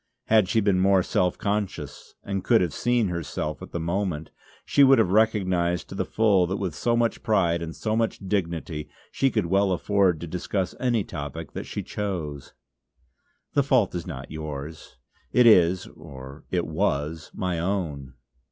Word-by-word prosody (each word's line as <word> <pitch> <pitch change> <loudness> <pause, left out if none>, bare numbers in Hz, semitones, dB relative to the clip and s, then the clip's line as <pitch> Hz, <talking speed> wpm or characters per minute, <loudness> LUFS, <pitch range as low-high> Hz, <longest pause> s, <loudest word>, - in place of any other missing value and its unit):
Had 110 -4 +4
she 110 - +2
been 100 -3 +2
more 95 0 +4
self 90 0 0
conscious, 100 -8 -4
and 95 -2 -3
could 115 +3 +5
she 90 - +2
have 85 -5 -2
seen 120 -4 +1
herself 75 -3 -4
at - - -9
the 85 - -3
moment, 85 -2 -2 0.3
she 140 - +4
would 135 0 +7
have 110 -6 +3
recognised 95 -5 +1
to - - -7
the - - -2
full 100 -5 +3
that 95 +3 -2
with 95 -5 -3
so 120 +8 0
much 115 -1 0
pride 85 -6 +2
and 80 -1 -5
so 110 -1 -1
much 115 0 0
dignity 85 -5 -3 0.2
she 135 - +2
could 110 -6 0
well 95 +3 +2
afford 95 -2 +2
to 85 - -5
discuss 90 +2 -2
any 120 -4 +1
topic 75 +1 -6
that - - -6
she - - -4
chose. 85 -9 -5 1.0
"The 145 - +4
fault 130 -7 +2
is 85 -2 -4
not 65 +2 -7
yours. 75 -3 -7 0.4
It 125 - +5
is, 90 -5 +5
or 70 -3 -12
it - - 0
was, 75 +3 -1
my 90 -4 -2
own." 80 -8 -3
90 Hz, 175 wpm, -25 LUFS, 80-105 Hz, 1.0 s, would